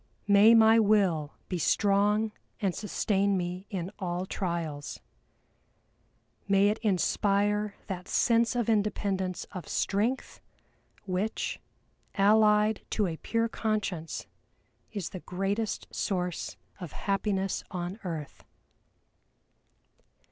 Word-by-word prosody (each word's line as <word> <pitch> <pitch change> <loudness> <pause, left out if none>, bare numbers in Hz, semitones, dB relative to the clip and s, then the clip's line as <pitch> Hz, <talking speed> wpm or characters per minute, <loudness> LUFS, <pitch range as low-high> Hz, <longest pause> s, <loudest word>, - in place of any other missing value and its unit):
May 205 +3 +7
my 225 0 +7
will 195 -8 +2
be 180 - -3
strong 210 +4 +2 0.3
and 195 -4 0
sustain 200 -1 0
me 180 +2 -4
in 185 -2 -4
all 180 -1 -2
trials. 170 -7 -4 1.5
May 200 0 +4
it 215 - -1
inspire 205 0 +1
that 185 -2 -6
sense 235 0 +2
of 240 -3 0
independence 200 -4 0
of 180 - -7
strength 220 +7 -1 0.6
which, 195 +3 -2 0.6
allied 210 +1 +4
to 210 - +1
a 165 -3 -3
pure 230 +5 0
conscience, 210 -8 -2 0.7
is 200 -6 -4
the 185 - -7
greatest 195 +5 -2
source 180 -3 -2 0.2
of 175 -5 -7
happiness 195 -1 -1
on 180 +3 -5
earth!" 160 -6 -6
200 Hz, 100 wpm, -29 LUFS, 180-210 Hz, 1.5 s, May